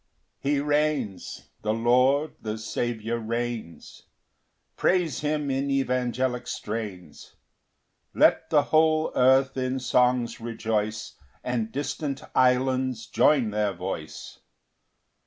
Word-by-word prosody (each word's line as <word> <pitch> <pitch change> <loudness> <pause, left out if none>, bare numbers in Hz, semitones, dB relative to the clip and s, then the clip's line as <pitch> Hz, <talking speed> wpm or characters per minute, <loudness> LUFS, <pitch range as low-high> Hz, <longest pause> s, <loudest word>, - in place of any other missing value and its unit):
1 140 - 0
He 140 - +2
reigns; 145 -8 -1
the 110 +1 0
Lord, 125 +6 +3
the 110 0 -4
Saviour 115 +1 -3
reigns; 115 -5 -5 0.7
Praise 175 -8 +1
him 150 -1 -1
in 135 +1 -1
evangelic 125 -2 -1
strains; 105 -9 -6 0.8
Let - - +4
the 145 -1 +4
whole 155 +1 +2
earth 130 +1 +4
in 130 0 -1
songs 125 -1 +1
rejoice, 110 -2 -2 0.3
And 115 -3 -2
distant 145 0 -3
islands 130 -2 +2
join 125 -3 +3
their 105 -1 0
voice. 90 0 -7
125 Hz, 100 wpm, -26 LUFS, 115-140 Hz, 0.8 s, Let